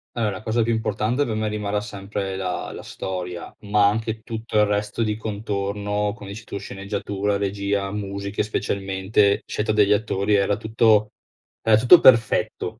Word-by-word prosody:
Allora 115 -3 0
la - - -11
cosa 115 +2 0
più 115 +1 +1
importante 110 +4 0
per 110 -4 -3
me 110 0 -1
rimarrà 105 -1 -2
sempre 100 -1 -5
la 90 -2 -3
la - - -8
storia, 90 -2 -6
ma 105 0 +3
anche 110 +1 -3
tutto 110 -1 -4
il 105 - +6
resto 105 +2 -1
di 105 -1 -1
contorno, 105 -1 -2
come 100 -2 -10
dici 110 +4 -8
tu: - - -6
sceneggiatura, 100 0 -3
regia, 100 0 -1
musiche 100 0 -3
specialmente, 100 -1 0
scelta 105 +1 -1
degli 105 -1 +3
attori. 105 -1 0
Era 100 0 +2
tutto 110 -1 +3 0.5
era 110 -1 +4
tutto 125 +10 +8
perfetto 115 -3 +3
105 Hz, 160 wpm, -23 LUFS, 100-110 Hz, 0.5 s, tutto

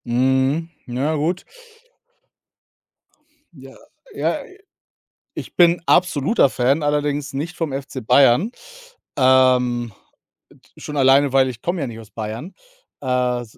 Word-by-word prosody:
Mhm, 130 +6 +1 0.2
ja 135 +6 -1
gut. 165 +5 -2 2.1
Ja, 135 -3 -14 0.4
ja, - - -2
i 385 -5 -17 0.8
ich - - -8
bin 175 -1 +4
absoluter 180 - +3
Fan, 135 +4 0
allerdings 145 -1 -1
nicht 155 +6 -5
vom 160 -4 -3
FC 135 -3 -6
Bayern. 135 - +4 0.7
Ähm, 125 -3 +3 0.6
äh, - - -23 0.2
d - - -15
schon 150 - -7
alleine, 135 0 +4
weil 135 -1 +4
ich 120 -2 -10
komme 175 0 -2
ja - - -1
nicht 115 -2 -8
aus 110 -1 -15
Bayern, 110 - -7 0.5
äh, 125 -2 0
135 Hz, 125 wpm, -20 LUFS, 125-155 Hz, 2.1 s, bin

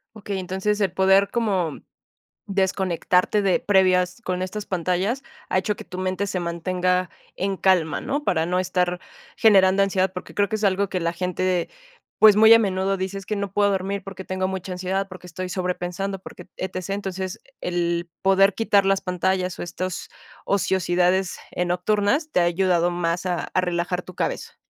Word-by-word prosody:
Okey, 200 -2 -5
entonces 190 +3 -1
el 195 -3 +1
poder 190 +1 +4
como, 195 -8 0
mm, - - -11 0.7
desconectarte 190 0 +1
de 195 -2 +2
previas 185 0 +2
con 185 0 -2
estas 200 +3 -4
pantallas, 185 - -1 0.2
ha - - 0
hecho 210 +3 0
que - - -9
tu 180 - -9
mente 185 +1 -1
se 185 - -2
mantenga 180 +1 0 0.3
en 195 +1 -1
calma, 180 -5 +2
¿no? 290 +2 -2
Para 160 -2 +1
no 180 +1 0
estar 180 -1 0 0.4
generando 195 -2 +5
ansiedad, 190 -1 +1
porque 180 - -8
creo 200 -1 +2
que 220 - -1
es 215 - -7
algo 195 0 +1
que 185 - -2
la 170 0 -1
gente, 180 0 -1 0.5
pues, 215 -2 +8
muy 220 +1 +8
a 230 - +7
menudo 195 -1 0
dice: 190 +1 -3
"Es 195 - -8
que 215 - -2
no 200 -1 -3
puedo 205 0 +3
dormir 195 +1 -2
porque 190 -1 -8
tengo 185 0 -1
mucha 190 0 -5
ansiedad, 190 +2 -2
porque 185 -1 -11
estoy 185 +2 -5
sobrepensando, 180 +1 -3
porque 185 - -12
ETC". 185 0 -5
Entonces, 190 -2 -4 0.2
el 175 -1 -1
poder 195 +1 +4
quitar 205 -3 +3
las 195 0 +3
pantallas, 185 0 -1
o, - - -4
estos 180 +1 -5 0.4
ociosidades, 185 -1 +1
eh, 180 - -1
nocturnas 205 - +1
te 180 - +3
ha - - +4
ayudado 175 0 +2
más 175 +1 -1
a 180 -1 -2
a 185 - +3
relajar 180 0 -1
tu 185 - -11
cabeza. - - -3
185 Hz, 180 wpm, -23 LUFS, 180-195 Hz, 0.7 s, pues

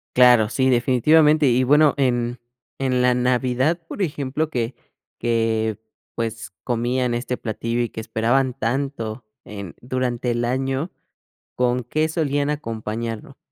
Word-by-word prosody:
Claro, 125 -3 +6
sí, 130 0 +1
definitivamente 150 +5 +4
y 125 +1 +3
bueno 145 +2 +5
en 120 -2 0 0.4
en 130 -2 +1
la 125 0 +4
Navidad, 125 +5 +1
por - - -6
ejemplo, 150 -2 -1
que 120 -2 -2 0.4
que 110 -2 0 0.4
pues 115 -1 -4
comían 125 +1 0
este 125 +1 -2
platillo 115 +1 -2
y 120 - -1
que 110 - -6
esperaban 120 +4 +1
tanto 120 -2 -2 0.2
en 100 -4 -8
durante 125 -1 -2
el 120 0 0
año, 135 +6 -1 0.6
¿con 125 0 +1
qué 155 +6 0
solían 145 -3 0
acompañarlo? 115 -2 -5
125 Hz, 130 wpm, -22 LUFS, 115-135 Hz, 0.6 s, Claro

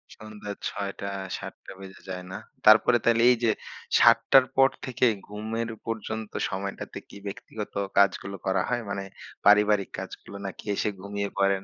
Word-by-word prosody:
সন্ধ্যা 105 -1 -8 0.2
৬ 100 -1 -4
টা 100 - -3 0.3
৭টা 100 0 -9
বেজে 95 0 -11
যায় 90 -1 -5
না। - - -5 0.3
তারপরে 110 +3 +7
তাইলে 115 0 +4
এই 125 - +3
যে, 115 - +4 0.5
৭ - - +8
টার 135 -1 +8
পর 135 0 +6 0.2
থেকে 130 -1 +1 0.2
ঘুমের 110 +3 -4 0.2
পর্যন্ত 110 -1 -4 0.2
সময়টাতে 100 +1 -5
কি 100 - -11
ব্যক্তিগত 105 +2 -7 0.2
কাজগুলো 100 0 +3
করা 95 -1 +2
হয়? 120 -1 0
মানে 100 -1 -3 0.4
পারিবারিক 105 -1 +5
কাজগুলো 100 - -8
নাকি 95 - -7
এসে 105 - 0
ঘুমিয়ে 100 0 -3
পড়েন? 100 -1 +2
105 Hz, 155 wpm, -27 LUFS, 100-110 Hz, 0.5 s, ৭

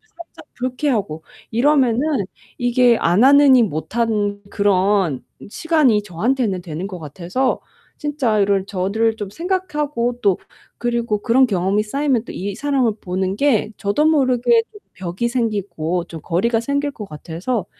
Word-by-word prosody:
살짝 340 0 -13
불쾌하고 245 - -2 0.3
이러면은 250 -1 +3 0.6
이게 245 -1 +3
안 175 +8 +3
하느니 275 -2 +7
못한 205 +3 -1
그런 195 -7 +1 0.3
시간이 295 -6 +2
저한테는 210 +1 -1
되는 170 +3 -5
것 185 -3 -7
같아서 180 - -2 0.4
진짜 280 -8 0
이럴 195 -1 +2
저들을 205 +4 0
좀 205 -3 -6
생각하고 295 - -2
또 195 -3 +2 0.4
그리고 235 -3 -1
그런 250 +4 +4
경험이 200 -1 0
쌓이면 270 +1 0
또 - - -7
이 195 +1 -4
사람을 270 -5 +1
보는 185 +1 -2
게 225 -4 +1
저도 205 +9 0
모르게 295 - +3
좀 420 - -14
벽이 185 +5 -3
생기고 200 -8 -2
좀 165 - -9
거리가 225 +7 +1
생길 280 +3 -1
것 215 -6 -8
같아서 170 - -4
225 Hz, 290 characters per minute, -20 LUFS, 195-260 Hz, 0.6 s, 하느니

